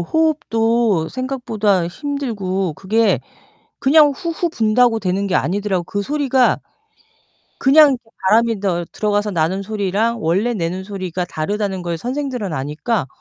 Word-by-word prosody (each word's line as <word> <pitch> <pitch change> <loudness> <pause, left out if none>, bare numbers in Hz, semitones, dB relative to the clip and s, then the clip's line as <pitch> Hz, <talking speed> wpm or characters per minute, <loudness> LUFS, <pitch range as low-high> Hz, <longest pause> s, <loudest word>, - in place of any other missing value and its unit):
호흡도 230 - +1
생각보다 220 -8 -1
힘들고, 200 - -3
그게 215 +4 +1 0.6
그냥 295 +2 +5
후후 335 +3 -2
분다고 225 -2 +2
되는 195 0 -1
게 185 - -1
아니더라고요. 190 +3 -1
그 205 +3 -3
소리가 270 -1 +2 1.0
그냥 295 +2 +6
이렇게 250 -2 -4 0.2
바람이 225 +1 +3
더 175 -3 -1
들어가서 210 0 0
나는 175 +3 0
소리랑 215 +2 -1
원래 195 +9 +1
내는 185 -1 -3
소리가 185 -3 -4
다르다는 195 +4 -3
걸 170 -1 -3
선생들은 250 - -3
아니까 150 - -2
210 Hz, 315 characters per minute, -19 LUFS, 185-250 Hz, 1.0 s, 그냥